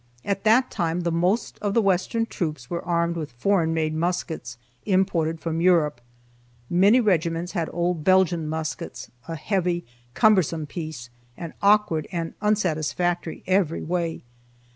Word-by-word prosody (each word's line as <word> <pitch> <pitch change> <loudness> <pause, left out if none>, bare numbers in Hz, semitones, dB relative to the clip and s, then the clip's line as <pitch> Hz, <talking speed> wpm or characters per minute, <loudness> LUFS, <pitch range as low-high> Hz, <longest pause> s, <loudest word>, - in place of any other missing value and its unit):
At 195 -1 -1
that 240 +4 +4
time 170 -2 -1
the 170 -1 -1
most 180 +7 0
of 205 -1 -2
the 230 - +5
western 195 +4 +1
troops 155 - -4
were 170 0 -3
armed 170 0 0
with 155 -5 -5
foreign 165 +5 +1
made 160 -1 0
muskets, 160 -6 -3 0.3
imported 185 -5 +1
from 165 0 -2
Europe. 160 -8 +3 0.7
Many 200 +8 +5
regiments 175 -5 +1
had 170 -5 -2
old 175 -2 -1
Belgian 180 -3 +3
muskets, 155 -4 -5 0.2
a 165 - -4
heavy, 175 +1 -1 0.3
cumbersome 180 -7 +3
piece, 155 -6 -7 0.3
and 165 -2 -7
awkward 200 -6 +3
and 165 -2 -3
unsatisfactory 175 -4 0
every 185 -3 +1
way. 170 -1 -2
170 Hz, 140 wpm, -24 LUFS, 160-190 Hz, 0.7 s, the